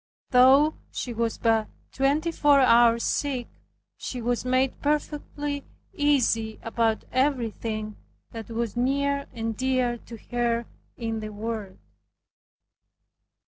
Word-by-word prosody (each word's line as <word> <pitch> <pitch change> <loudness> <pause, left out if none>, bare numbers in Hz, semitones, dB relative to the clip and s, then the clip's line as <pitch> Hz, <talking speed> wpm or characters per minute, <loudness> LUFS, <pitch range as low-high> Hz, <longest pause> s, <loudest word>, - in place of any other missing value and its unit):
Though 270 +4 +6 0.2
she 245 - -4
was 230 0 -1
but 225 -2 +2 0.2
twenty 290 +5 +1
four 290 -3 +4
hours 235 -2 +5
sick, 265 -4 -1 0.5
she 250 - -5
was 240 0 -1
made 255 +1 +1
perfectly 290 -1 -2 0.3
easy 240 -7 +1
about 225 -1 0
everything 230 -5 -1 0.3
that 225 -1 -8
was 230 -1 -3
near 280 +3 0
and 225 -2 -3
dear 255 -1 0
to 230 +1 -11
her 235 -1 0 0.3
in 225 -1 -3
this 215 0 -5
world. 215 -2 -5
240 Hz, 110 wpm, -26 LUFS, 225-275 Hz, 0.5 s, Though